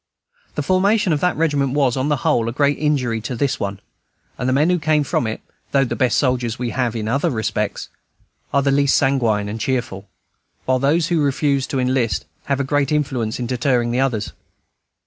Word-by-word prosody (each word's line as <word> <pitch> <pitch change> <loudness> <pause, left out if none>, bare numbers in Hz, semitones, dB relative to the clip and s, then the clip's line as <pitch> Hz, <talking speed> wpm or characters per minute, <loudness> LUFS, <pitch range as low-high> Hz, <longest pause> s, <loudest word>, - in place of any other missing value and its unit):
The 150 - -1
formation 190 +2 +2
of 150 - 0
that 180 +3 0
regiment 145 -4 +1
was, 140 -4 +2
on 135 +2 -1
the 150 - +3
whole, 115 -1 +2
a - - -3
great 145 +3 +1
injury 130 -7 0
to 125 +3 -4
this 135 +3 -1
one; 100 -1 -3 0.6
and 125 - -2
the - - +2
men 150 +6 +3
who 180 - +1
came 155 -1 +2
from 125 -4 -1
it, 110 - -4 0.3
though 135 -1 +4
the - - -3
best 125 -2 +1
soldiers 125 -3 0
we 120 -2 -3
have 120 -1 -1
in 110 -1 -3
other 135 +5 +1
respects, 110 -4 -2 0.6
are 140 - +2
the 140 - +2
least 140 0 +3
sanguine 120 -7 +1
and 110 +2 -5
cheerful; 115 -7 -2 0.6
while 130 0 +2
those 155 +5 +2
who 170 - +2
now - - +2
refuse 140 -1 +1
to 135 - -2
enlist 125 -2 0 0.2
have 140 -1 0
a - - +1
great 140 0 0
influence 130 -7 -1
in 125 - -2
deterring 120 -1 0
others. 115 -6 -1
135 Hz, 205 wpm, -20 LUFS, 120-145 Hz, 0.6 s, though